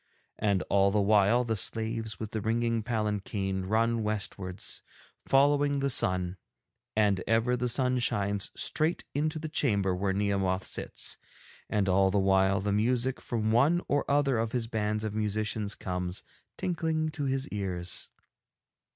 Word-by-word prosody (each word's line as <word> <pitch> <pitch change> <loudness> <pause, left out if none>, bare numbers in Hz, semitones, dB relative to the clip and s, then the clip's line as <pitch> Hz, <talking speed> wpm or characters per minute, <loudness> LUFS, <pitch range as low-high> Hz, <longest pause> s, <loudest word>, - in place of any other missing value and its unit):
And 100 -3 +1
all 100 0 +3
the 105 +1 +1
while 105 +3 +4
the 115 -2 -1
slaves 110 +1 -2
with 110 -2 -5
the 110 - -3
ringing 115 +1 0
palanquin 105 -4 -2
run 115 +2 +1
westwards, 100 -3 -3 0.5
following 145 +1 +3
the 140 0 +1
sun, 90 -4 +2 0.6
and 100 -3 +2
ever 115 +2 +2
the 125 0 -1
sun 125 +1 +2
shines 100 -3 0
straight 160 +2 +1
into 155 +2 -1
the 155 0 -4
chamber 100 - +1
where 95 +2 0
Nehemoth 95 -1 0
sits, - - -3 0.5
and 100 -2 +1
all 95 +1 +4
the 100 - 0
while 95 0 +3
the 100 0 -1
music 125 +4 +1
from 110 -3 -1
one 140 +9 +4
or 145 - +1
other 140 -4 +2
of 115 0 -2
his 120 -2 0
bands 105 -1 -2
of 110 -2 -3
musicians 105 0 -1
comes 90 -1 -3 0.3
tinkling 160 -3 -1
to 150 -2 -4
his 135 +1 -1
ears. 90 -4 -3
110 Hz, 150 wpm, -29 LUFS, 100-125 Hz, 0.6 s, while